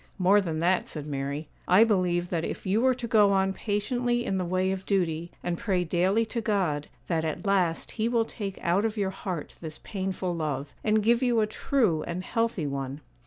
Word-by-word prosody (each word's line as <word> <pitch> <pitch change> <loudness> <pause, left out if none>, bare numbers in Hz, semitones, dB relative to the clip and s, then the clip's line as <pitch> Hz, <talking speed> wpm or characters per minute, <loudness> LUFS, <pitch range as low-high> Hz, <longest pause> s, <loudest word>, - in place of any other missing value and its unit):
'More 200 +2 +5
than 165 -4 -3
that,' 175 +3 +2
said 150 -2 -5
Mary; 140 +1 -3 0.2
'I 185 +5 +7
believe 180 -5 +1
that 165 -2 0
if - - -5
you 200 +4 +2
were 260 0 +4
to 240 -1 -5
go 210 -4 +5
on 195 0 +2
patiently 240 +4 -1
in 190 -4 0
the - - 0
way 185 +2 +1
of 190 0 -4
duty, 170 -4 0
and 175 -1 -2
pray 195 -6 +1
daily 185 +6 +2
to 230 +1 -3
God, 185 -9 0 0.2
that 165 -2 0
at 160 +5 -3
last 185 -4 +1
He 225 0 -1
will 230 -2 +2
take 200 -4 -6
out 180 +4 +2
of 225 0 -1
your 195 -2 0
heart 185 -5 -5
this 155 -2 -6
painful 190 -2 -3
love, 145 -3 -3
and 215 0 +2
give 235 +3 +3
you 245 -3 +3
a 215 - +3
true 215 - +1
and 175 +2 -3
healthy 230 -6 -1
one. 140 0 -4
190 Hz, 210 wpm, -27 LUFS, 170-215 Hz, 0.2 s, I